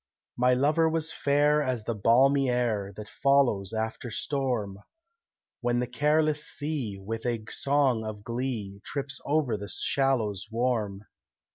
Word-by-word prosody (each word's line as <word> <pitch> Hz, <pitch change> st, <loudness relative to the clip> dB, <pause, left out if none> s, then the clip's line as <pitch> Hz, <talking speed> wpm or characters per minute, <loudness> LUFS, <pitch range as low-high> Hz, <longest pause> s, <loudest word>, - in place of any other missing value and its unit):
My 125 Hz, +1 st, +3 dB
lover 150 Hz, +5 st, +3 dB
was 160 Hz, 0 st, -1 dB
fair 145 Hz, +1 st, +3 dB
as 130 Hz, -5 st, -1 dB
the 115 Hz, -, -2 dB
balmy 130 Hz, +6 st, +4 dB
air 115 Hz, -5 st, 0 dB
That 105 Hz, 0 st, -7 dB
follows 125 Hz, -9 st, +2 dB
after 110 Hz, +2 st, -3 dB
storm, 115 Hz, -5 st, -2 dB, 0.8 s
When 120 Hz, -1 st, 0 dB
the 125 Hz, -, 0 dB
careless 150 Hz, +4 st, +1 dB
sea, 145 Hz, -9 st, -3 dB
with 110 Hz, +4 st, -5 dB
a 115 Hz, -3 st, -2 dB
song 135 Hz, -5 st, +2 dB
of 105 Hz, -1 st, -6 dB
glee, 115 Hz, -5 st, -4 dB
Trips 140 Hz, -1 st, -5 dB
over 145 Hz, -6 st, +1 dB
the 100 Hz, 0 st, -7 dB
shallows 115 Hz, -9 st, 0 dB
warm. 110 Hz, -4 st, -1 dB
125 Hz, 135 wpm, -28 LUFS, 110-140 Hz, 0.8 s, balmy